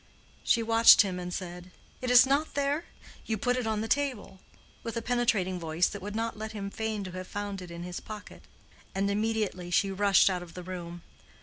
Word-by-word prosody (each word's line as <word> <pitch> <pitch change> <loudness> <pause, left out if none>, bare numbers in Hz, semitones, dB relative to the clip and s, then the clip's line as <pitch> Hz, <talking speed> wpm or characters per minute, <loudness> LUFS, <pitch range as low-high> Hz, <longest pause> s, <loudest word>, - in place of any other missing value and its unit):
She 230 - +3
watched 225 0 +7
him 185 -2 -3
and 180 0 -5
said, 180 0 -6 0.3
"It 255 - -2
is 245 +1 +8
not 280 +4 0
there?—you 280 -5 -3
put 245 +5 +1
it 250 -3 -2
on 215 -1 0
the 220 - -3
table," 260 -8 -1 0.4
with 230 0 -5
a - - -1
penetrating 225 -7 +1
voice 165 +1 +1
that 200 - -7
would 205 +2 -6
not 230 +1 -2
let 220 0 -5
him 200 -2 -5
feign 220 -1 -3
to 185 - -7
have 185 0 -7
found 205 -2 -5
it 180 - -9
in 170 0 -7
his 180 0 -5
pocket; 215 -1 -10 0.5
and 200 +1 +1
immediately 210 -4 -1
she 195 +3 +2
rushed 200 -1 +4
out 185 -2 +1
of 175 -1 -11
the 180 - -7
room. 175 -2 -7
205 Hz, 205 wpm, -29 LUFS, 180-225 Hz, 0.5 s, is